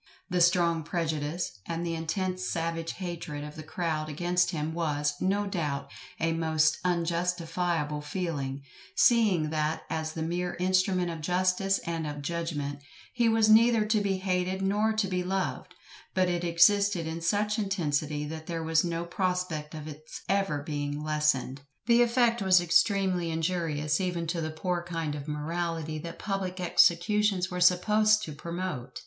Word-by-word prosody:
The 180 -1 +2
strong 170 -1 +3
prejudice, 160 - -3
and 170 +1 -3
the 170 - -2
intense 185 +3 -2
savage 165 0 -2
hatred 170 -5 -5
of 150 0 -8
the 155 - -7
crowd 155 -1 -3
against 175 +4 +1
him 160 -2 -3
was, 150 -3 0
no 200 +2 +1
doubt, 160 -8 -3 0.3
a 165 0 +1
most 160 -1 +2
unjustifiable 170 -3 -1
feeling, 145 -4 -3 0.3
seeing 200 -10 +4
that 155 0 -1
as 155 0 -2
the 160 - -3
mere 175 +2 -2
instrument 185 -1 +2
of 165 -1 -6
justice 185 +3 +1
and 165 -2 -2
of 145 -1 -6
judgment, 145 -3 -3 0.3
he 240 -2 +3
was 225 -1 +4
neither 225 0 +5
to 215 0 +2
be 195 -2 0
hated 185 0 -1
nor 210 +3 +2
to 215 -2 0
be 180 -1 -1
loved; 190 +1 -3 0.4
but 185 -1 +3
it 175 -1 -1
existed 175 +1 +4
in 160 +1 -4
such 210 +5 +1
intensity 155 -7 -1
that 160 +1 -7
there 165 -1 -3
was 160 0 +2
no 170 -1 -2
prospect 180 -4 -2
of 155 0 -7
its 155 +1 -9
ever 195 -8 0
being 145 0 -3
lessened. 150 -3 0 0.2
The 235 +1 +5
effect 235 -1 +3
was 185 -2 +5
extremely 180 0 +2
injurious 160 -1 -1
even 175 -2 -1
to 165 0 -1
the 155 - -2
poor 175 +3 -2
kind 165 -3 -3
of 145 0 -6
morality 160 +1 -3
that 170 +2 -7
public 195 -2 -3
executions 185 +2 +3
were 180 0 -3
supposed 210 +4 +4
to 155 - -5
promote. 170 -6 -5
170 Hz, 155 wpm, -28 LUFS, 155-185 Hz, 0.4 s, neither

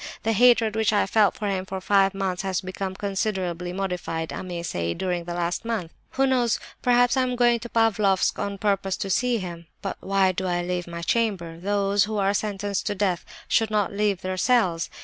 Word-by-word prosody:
The 225 - +1
hatred 230 -1 +4
which 220 -1 +2
I 205 - +3
felt 205 0 +3
for 210 - -3
him 190 -2 -1
for 190 0 -5
five 195 0 +3
months 190 -2 -1
has 190 -1 -1
become 190 0 -5
considerably 190 -3 -2
modified, 180 -4 -3
I - - -4
may 175 -2 -5
say, 85 - -2
during 180 -2 -2
the 175 0 -4
last 175 0 -1
month. 225 -8 -3 0.2
Who 270 - +2
knows, 250 -3 +2 0.2
perhaps 245 0 +4
I 260 - +3
am 250 -1 0
going 240 -1 +3
to 240 +1 -8
Pavlofsk 210 -4 +2
on 200 -1 -3
purpose 195 -2 0
to 195 - -3
see 240 +3 +2
him! 170 -4 -7 0.2
But 195 - -3
why 195 -1 +2
do 185 +1 -3
I 175 -1 0
leave 180 0 -3
my 170 0 -6
chamber? 175 -6 -1
Those 200 +1 +1
who 215 0 -3
are 200 0 +2
sentenced 205 -1 -2
to 205 - -1
death 190 -3 0 0.2
should 225 -1 +2
not 210 -2 0
leave 205 -2 0
their 185 0 -3
cells. 185 -8 +2
195 Hz, 205 wpm, -25 LUFS, 180-215 Hz, 0.2 s, hatred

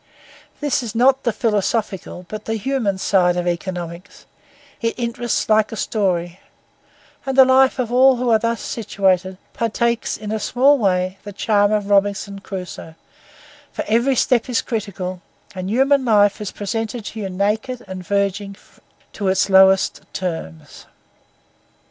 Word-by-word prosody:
This 290 -2 0
is 230 -2 -6
not 260 +3 +4
the 235 - 0
philosophical, 210 -4 -2
but 215 +2 -7
the 225 - -2
human 220 -3 -1
side 180 -2 +2
of 175 0 -2
economics; 175 +1 -5 0.6
it 230 -1 -1
interests 240 -1 -2
like 215 -1 +3
a - - -5
story; 180 -5 -1 0.8
and 270 -1 -3
the 265 - +9
life 260 0 +4
all 255 +2 +4
who 245 -1 0
are 220 - +5
thus 230 0 -1
situated 190 -4 -1 0.2
partakes 235 +1 -1
in 210 -1 -6
a 220 - -1
small 270 +6 +3
way 185 -2 0
the 205 - -8
charm 205 +1 +2
of 205 -1 -1
Robinson 200 0 +1
Crusoe; 180 -4 -8 0.8
for - - -4
every 235 +5 +2
step 250 -1 +2
is 245 - 0
critical 190 -5 -4 0.3
and 185 0 -5
human 270 +4 +3
life 205 -4 +3
is 210 - -3
presented 225 +2 -4
to 220 - -7
you 195 -2 -4
naked 220 +6 -2
and 185 -1 -7
verging 200 +1 -1 0.6
to 200 - -3
its 190 +1 +1
lowest 190 0 +5
terms. 160 - -6
210 Hz, 145 wpm, -20 LUFS, 190-235 Hz, 0.8 s, the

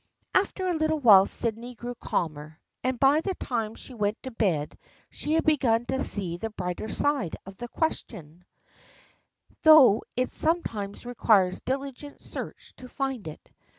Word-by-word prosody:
After 375 -1 +1
a 360 - +1
little 315 -1 0
while 205 -9 +7
Sydney 235 +2 0
grew 240 +2 -6
calmer, 155 -7 -4 0.2
and 255 -1 -1
by 280 +3 +4
the 380 +2 -3
time 225 -3 -3
she 260 - -10
went 210 -1 -1
to 260 - -6
bed 180 -10 -1 0.4
she 300 - -2
had 325 - +2
begun 240 -7 +2
to 265 +2 -2
see 180 -4 +1
the 225 +5 -4
brighter 185 0 -5
side 280 - 0
of 195 0 -11
the 240 - -6
question, 180 - -4 1.2
though 295 -9 +7 0.2
it 255 0 -1
sometimes 230 - -2
requires 210 -6 +2
diligent 275 +2 -5
search - - -8
to 255 - -11
find 270 - -4
it. 155 - -10
240 Hz, 150 wpm, -26 LUFS, 200-275 Hz, 1.2 s, while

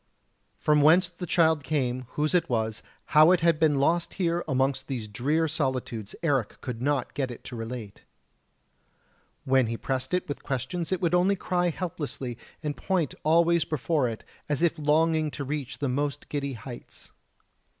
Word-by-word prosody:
From 150 -1 +3
whence 170 +5 +5
the 175 0 -7
child 160 -4 +3
came, 130 -3 -1
whose 150 +2 0
it 180 - +2
was, 110 -2 -1 0.3
how 155 +2 +8
it 180 -2 +4
had 165 -2 +3
been 155 -3 +3
lost 165 +5 +1
here 175 -2 0
amongst 135 -1 0
these 120 -6 -4
drear 145 +10 0
solitudes 130 -8 -2
Eric 135 -9 0
could 120 -2 -6
not 140 -2 0
get 135 -2 -1
it 120 - -9
to 125 - -8
relate. 115 -2 -6 1.4
When 130 -2 +3
he 115 +1 -3
pressed 130 +7 -2
it 180 - -2
with 145 - -5
questions 135 +7 -3
it 185 - 0
would 170 -1 +1
only 180 +3 +4
cry 180 -1 0
helplessly, 145 -7 -4 0.3
and 150 -1 -2
point 180 -7 -1
always 170 +2 +4
before 150 -3 0
it, 110 - -7 0.3
as 150 +2 0
if 170 -1 +2
longing 155 +1 +2
to 145 - -5
reach 140 -1 -4
the 140 - -1
most 140 +2 -2
giddy 140 -2 -2
heights. 120 +1 -10
145 Hz, 170 wpm, -27 LUFS, 130-165 Hz, 1.4 s, how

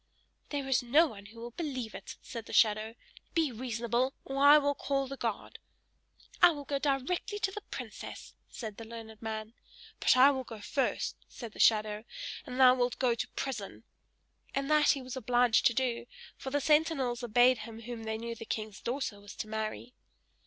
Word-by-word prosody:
"There 285 -2 -3
is 265 -2 +3
no 280 +7 +5
one 205 -9 -8
who 225 +2 -13
will 240 +1 -7
believe 255 -6 -4
it!" 195 - -8
said 230 -1 -7
the - - -8
shadow. 215 +1 +3 0.4
"Be 320 -5 +2
reasonable, 240 +2 -1
or 275 +1 -1
I 290 +1 +10
will 285 -1 +2
call 275 -1 -1
the 270 +1 -6
guard!" 230 -5 -4 0.8
"I 350 - +10
will 295 -4 -4
go 280 0 -1
directly 290 +9 -1
to 415 -2 0
the 420 - -6
princess!" - - -7 0.2
said 215 -4 -7
the 230 - -7
learned 220 -1 -10
man. 220 0 -5 0.5
"But - - +4
I 270 +3 +8
will 265 -2 -2
go 225 -3 -9
first!" 270 +6 -1
said 235 -3 -8
the - - -14
shadow. 215 -1 +3 0.4
"And 250 +1 -5
thou 255 -1 +9
wilt 245 -1 0
go 250 -2 +2
to 230 - -3
prison!" 230 -8 -4 0.7
and 275 +2 -1
that 300 -1 +5
he 275 -3 +2
was 255 0 -6
obliged 245 -1 +3
to 235 - +1
do 245 -2 -1 0.3
for 265 - -6
the 290 +2 0
sentinels 295 -5 +2
obeyed 245 +2 +4
him 225 +1 -8
whom 235 0 -6
they 220 0 -2
knew 230 +1 -4
the 230 - -8
king's 215 -2 -5
daughter 240 -5 -3
was 205 0 -11
to - - -5
marry. 220 +3 -4
245 Hz, 190 wpm, -31 LUFS, 225-275 Hz, 0.8 s, I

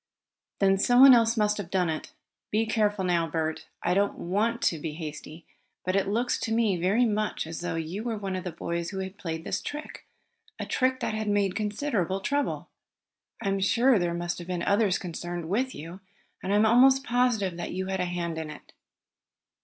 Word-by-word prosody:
"Then 195 -1 +3
someone 250 +5 +8
else 230 -1 +4
must 210 -1 +2
have 185 -4 -5
done 185 -1 +1
it. 160 -1 -4 0.4
Be 220 +2 +1
careful 210 -3 +1
now, 170 -2 +1
Bert. 160 0 -3 0.2
I - - +2
don't 200 +2 +1
want 215 +6 -1
to 165 - +1
be 155 0 -4
hasty, 155 0 -8 0.4
but 185 +1 0
it 195 - +2
looks 235 +5 0
to 225 - -3
me 225 -4 +2
very 190 +8 +2
much 215 -4 -1
as 160 0 -6
though 175 -1 -2
you 165 +5 -4
were 230 -1 -3
one 195 -2 -3
of 185 - -4
the 180 - -4
boys 170 +1 -3
who 195 - -6
had 190 +1 -5
played 165 -4 -4
this 190 - -2
trick 300 +1 -7 0.5
a - - -4
trick 260 0 0
that - - -1
has 215 0 -3
made 205 -2 +1
considerable 210 - -1
trouble. 285 +8 -2 0.7
I 200 - 0
am 195 0 0
sure 235 +4 +4
there 175 -1 -1
must 175 0 -3
have 175 - -8
been 180 -1 -2
others 200 -2 +2
concerned 175 -1 -5
with 250 +8 -1
you, 165 +5 -8 0.4
and 190 - -3
I - - +3
am 210 +1 +5
almost 260 +4 +6
positive 240 -8 +1
that 175 - -5
you 190 +1 -2
had 190 0 -2
a 180 - +1
hand 170 -2 -3
in 160 -1 -5
it. 150 - -12
195 Hz, 205 wpm, -27 LUFS, 175-220 Hz, 0.7 s, someone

